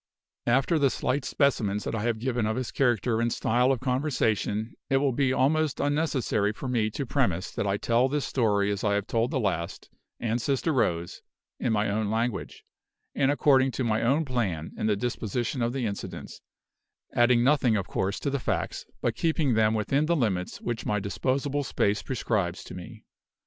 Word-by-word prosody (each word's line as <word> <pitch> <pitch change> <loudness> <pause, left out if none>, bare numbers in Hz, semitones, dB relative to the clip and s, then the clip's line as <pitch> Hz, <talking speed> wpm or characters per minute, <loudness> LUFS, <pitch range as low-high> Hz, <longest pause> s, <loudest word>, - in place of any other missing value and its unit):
After 135 +7 +3
the 140 -2 +4
slight 130 +2 -1
specimens 105 -8 +1
that - - -3
I 110 - -1
have 115 0 0
given 120 -1 -1
of 110 - -1
his 130 -1 -3
character 120 -3 +1
and 120 0 +1
style 125 +4 +2
of 130 - -1
conversation, 125 -5 0 0.2
it 135 - +3
will 135 0 +2
be 130 +1 +1
almost 150 +3 +1
unnecessary 145 -8 +1
for 130 - -6
me 115 -4 +1
to 135 +6 -4
premise 100 - 0
that - - -2
I 100 +1 +1
tell 120 +5 +2
this 145 0 -1
story 105 -5 +1
as 100 - -3
I 100 -1 +2
have 100 -1 -1
told 115 +2 0
the 135 - -1
last, 90 -7 -3 0.3
and 115 +1 -1
"Sister 140 +5 0
Rose," 85 -9 0 0.4
in 120 - 0
my 105 -1 +1
own 105 +1 -1
language, 110 -7 -2 0.5
and 135 -1 +2
according 135 -2 +4
to 130 - -2
my 110 -2 +1
own 140 +7 +2
plan 100 - -2
in - - -1
the 105 - +3
disposition 120 +3 -2
of 120 0 +1
the 130 -1 -2
incidents 100 -2 -6 0.7
adding 120 0 +4
nothing, 130 -4 +3
of 95 - -3
course, 95 +1 -1
to 140 - -1
the 140 - -1
facts, - - -2 0.2
but - - +1
keeping 160 -5 +1
them 110 0 +3
within 135 +8 +1
the 170 - +3
limits 100 - -1
which 120 -2 -3
my 105 0 0
disposable 135 +8 -1
space 105 -5 0
prescribes 105 -8 -2
to - - -10
me. 110 +5 -10
120 Hz, 190 wpm, -27 LUFS, 105-135 Hz, 0.7 s, the